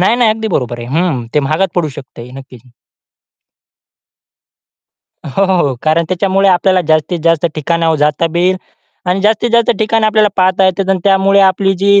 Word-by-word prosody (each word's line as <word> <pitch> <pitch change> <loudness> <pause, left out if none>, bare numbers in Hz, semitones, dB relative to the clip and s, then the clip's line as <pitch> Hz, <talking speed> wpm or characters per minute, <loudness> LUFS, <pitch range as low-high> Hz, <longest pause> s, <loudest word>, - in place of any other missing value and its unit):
नाही, 205 +6 +2
नाही, 240 -3 +3
अगदी 220 0 -3
बरोबर 120 - -3
आहे. 120 - -7
हं, 145 -10 -2
ते 150 - +3
महागात 155 +7 -1
पडू 175 -3 -1
शकतंय 125 -2 -11
नक्कीच. 125 -2 -15 2.5
हो, 160 +7 -1
हो, 190 -1 +1
हो. 130 - -3
कारण 160 +2 +1
त्याच्यामुळे 195 +1 +1
आपल्याला 185 0 +2
जास्तीत 155 +2 0
जास्त 165 0 +2
ठिकाणं 165 +2 0
जाता 150 +3 +1
येईल 180 +2 +1 0.5
आणि 185 +2 0
जास्तीत 220 +3 +1
जास्त 235 0 +3
ठिकाणं 220 0 +1
आपल्याला 215 -1 +2
पाहता 185 +1 +2
येतात 190 +1 0
आणि 190 - +1
त्यामुळे 195 0 +3
आपली 195 0 +2
जी 200 +1 +3
185 Hz, 165 wpm, -13 LUFS, 155-195 Hz, 2.5 s, नाही